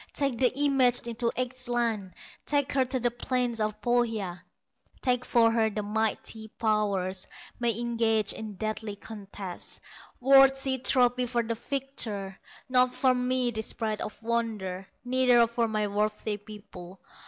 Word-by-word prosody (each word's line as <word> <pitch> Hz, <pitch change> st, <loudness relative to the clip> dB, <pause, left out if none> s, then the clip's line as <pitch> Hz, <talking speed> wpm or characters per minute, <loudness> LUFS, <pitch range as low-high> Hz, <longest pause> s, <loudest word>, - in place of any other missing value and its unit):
Take 275 Hz, -4 st, -1 dB
the 255 Hz, -2 st, +4 dB
image 270 Hz, -4 st, +4 dB
into 235 Hz, 0 st, -2 dB
Ehstland, 240 Hz, -6 st, -1 dB, 0.3 s
Take 285 Hz, -1 st, +1 dB
her 265 Hz, -2 st, +2 dB
to 255 Hz, +1 st, 0 dB
the 240 Hz, 0 st, +1 dB
plains 240 Hz, -1 st, -1 dB
of 215 Hz, 0 st, -1 dB
Pohya, 225 Hz, -7 st, 0 dB, 0.6 s
That 250 Hz, -1 st, +2 dB
for 230 Hz, -1 st, +4 dB
her 225 Hz, -1 st, +2 dB
the 210 Hz, 0 st, -3 dB
mighty 220 Hz, +1 st, -2 dB
powers 200 Hz, -4 st, -1 dB, 0.3 s
May 235 Hz, -3 st, +1 dB
engage 230 Hz, -3 st, +1 dB
in 215 Hz, -2 st, -7 dB
deadly 215 Hz, 0 st, -4 dB
contest, 200 Hz, -3 st, -7 dB, 0.4 s
Worthy 270 Hz, 0 st, +5 dB
trophy 250 Hz, -1 st, +2 dB
for 240 Hz, -1 st, 0 dB
the 230 Hz, 0 st, -2 dB
victor; 230 Hz, -6 st, -3 dB, 0.3 s
Not 250 Hz, -1 st, +3 dB
for 260 Hz, -1 st, +3 dB
me 250 Hz, 0 st, 0 dB
this 220 Hz, -1 st, -3 dB
bride 220 Hz, -2 st, -2 dB
of 215 Hz, -, -6 dB
wonder, 215 Hz, -5 st, -2 dB, 0.2 s
Neither 250 Hz, -1 st, +4 dB
for 235 Hz, 0 st, 0 dB
my 215 Hz, -1 st, 0 dB
worthy 210 Hz, +1 st, -1 dB
people. 200 Hz, -3 st, -11 dB
230 Hz, 140 wpm, -28 LUFS, 210-250 Hz, 0.6 s, Worthy